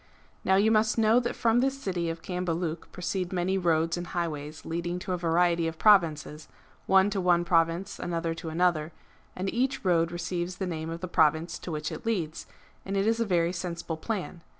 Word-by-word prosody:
Now 190 - +3
you 210 +3 +4
must 220 0 +3
know 225 +1 +5
that 240 -1 -3
from 230 0 +3
this 270 +2 0
city 180 -8 -2
of 165 0 -6
Cambaluc 175 -2 -3
proceed 180 0 -3
many 185 +1 0
roads 165 -2 +1
and 175 0 -5
highways 155 -3 -4
leading 170 +1 -3
to 185 +1 -5
a - - 0
variety 170 0 +2
of 165 0 -5
provinces, 160 -7 +3 0.4
one 190 +1 +5
to 195 - -1
one 175 -1 +3
province,' 170 +3 +1
another 165 -1 -2
to 165 0 -6
another; 165 -1 +1 0.4
and 185 +1 -3
each 260 0 -1
road 170 -2 +3
receives 175 +1 -3
the 190 - -3
name 160 -2 -4
of 165 +1 -6
the 185 - -3
province 160 +1 +2
to 175 - -7
which 155 +1 -3
it 160 - -7
leads; 175 -9 -2 0.4
and 195 +1 -3
it 195 - +2
is 225 +1 +2
a 230 - +1
very 175 -2 +2
sensible 170 -2 -4
plan. 180 0 -4
175 Hz, 195 wpm, -28 LUFS, 165-190 Hz, 0.4 s, know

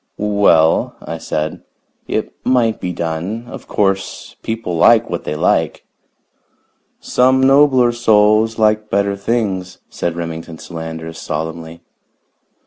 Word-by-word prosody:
"Well," 100 -6 +3
I 80 - -7
said, 75 0 -3 0.5
"it - - -2
might 120 -4 +1
be 90 - -2
done. 85 +7 -4
Of 130 0 -10
course, 95 -1 -2
people 110 -6 -3
like 115 +6 +4
what 85 - -4
they 75 - -3
like." - - 0 1.1
"Some 130 +1 +2
nobler 135 -2 +5
souls 110 -1 +3
like 110 -1 +2
better 100 0 +1
things," 100 -4 -2
said 85 -1 -3
Remington 80 -1 -6
Solander 80 -1 -7
solemnly. 80 +1 -5
100 Hz, 115 wpm, -17 LUFS, 80-115 Hz, 1.1 s, nobler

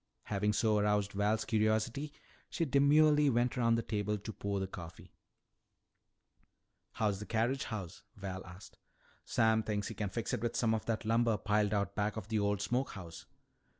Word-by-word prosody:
Having 105 0 0
so 110 -1 +2
aroused 105 -1 +1
Val's 105 +2 0
curiosity, 110 +6 0 0.4
she 165 - -1
demurely 150 +1 +5
went 120 0 +1
around 115 -2 +3
the 115 - -1
table 105 -1 -1
to 105 +2 -7
pour 100 0 -2
the 95 - -1
coffee. 85 -2 -10 1.8
"How's 105 -3 0
the 105 - -7
carriage 120 +5 0
house?" 100 -7 -6
Val 95 -1 -6
asked. 95 +2 -13 0.5
"Sam 110 0 +3
thinks 105 -2 -2
he - - -5
can 105 -2 -3
fix 110 +4 -3
it - - -1
with 120 0 -2
some 115 -2 +2
of 110 - -3
that 115 -1 -1
lumber 115 0 +2
piled 105 -1 +1
out 100 -1 -1
back 105 +1 -1
of 95 - -6
the 110 -2 +1
old 100 -1 0
smoke 125 +7 -1
house." 85 -5 -9
110 Hz, 175 wpm, -33 LUFS, 100-115 Hz, 1.8 s, demurely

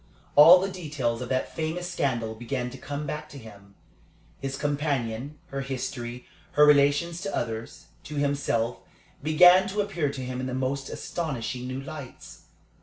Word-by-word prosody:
All 165 +5 +10
the 190 - -1
details 145 -10 -3
of 125 - -5
that 130 0 -1
famous 165 +3 -2
scandal 120 -9 -1
began 125 +2 -4
to 130 - -9
come 145 +2 -5
back 150 +1 -5
to 145 - -10
him. 100 -5 -13 0.6
His 135 0 -4
companion, 145 -2 -2
her 135 0 -3
history, 125 -2 -5 0.3
her 150 - +7
relations 150 +4 +4
to 195 0 -3
others, 115 -1 -4 0.2
to 150 - -7
himself, 140 -5 0 0.4
began 180 +5 +6
to 205 +2 -3
appear 175 -8 -1
to 130 -2 -6
him 125 0 -4
in 130 - -3
the 130 - -3
most 135 +1 -2
astonishing 130 -6 -4
new 130 +1 -4
lights. 140 -2 -10
140 Hz, 160 wpm, -27 LUFS, 125-155 Hz, 0.6 s, All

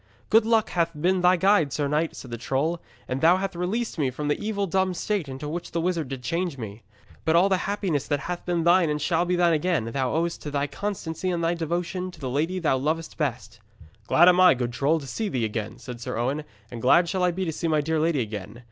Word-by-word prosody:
'Good 225 0 +5
luck 225 -1 +2
hath 170 -3 -1
been 180 +3 +2
thy 180 +1 +5
guide, 190 -5 +3
sir 145 +1 -1
knight,' 155 +3 0
said 125 - -10
the 120 - -4
troll, 150 +7 -1 0.3
'and 130 +1 -3
thou 170 +3 +6
hath 195 -1 -3
released 190 +4 -2
me 140 -3 +2
from 145 +4 -4
the 145 - 0
evil 205 -2 -1
dumb 190 0 0
shape 185 -3 -2
into 135 +3 -6
which 170 +3 -5
this 170 - -1
wizard 170 -5 -1
did 130 -1 -6
change 170 +2 -2
me. 110 -2 -7 0.4
But 160 - +2
all 180 +4 +5
the 190 - +3
happiness 190 -8 -1
that 145 -2 0
hath 175 0 -4
been 175 -2 0
thine 175 -1 +4
and 150 0 -1
shall 165 +3 +1
be 180 0 +1
thine 175 -1 +3
again, 160 -5 +1
thou 130 -1 0
owest 170 +1 -1
to 150 - -5
thy 145 0 0
constancy 180 +3 -4
and 170 -2 -1
thy 165 +1 +2
devotion 175 +2 -2
to 175 - -13
the 130 -4 -4
lady 160 +7 0
thou 155 -7 +1
lovest 155 +4 -2
best.' 120 -6 -3 0.5
'Glad 175 - +6
am 180 0 +6
I, 185 -6 +7
good 120 -1 -3
troll, 145 +7 +1
to 140 - -9
see 210 - -3
thee 125 -8 -1
again,' 110 0 -4
said 125 -2 -9
Sir - - -4
Owen, 135 +6 -1 0.3
'and 120 -2 -7
glad 170 +8 +5
shall 185 +2 -1
I 180 - +4
be 185 +2 -2
to 165 - -1
see 165 - -2
my 155 -1 +2
dear 160 +2 0
lady 160 -3 +1
again. 105 0 -6
165 Hz, 250 wpm, -25 LUFS, 140-180 Hz, 0.5 s, I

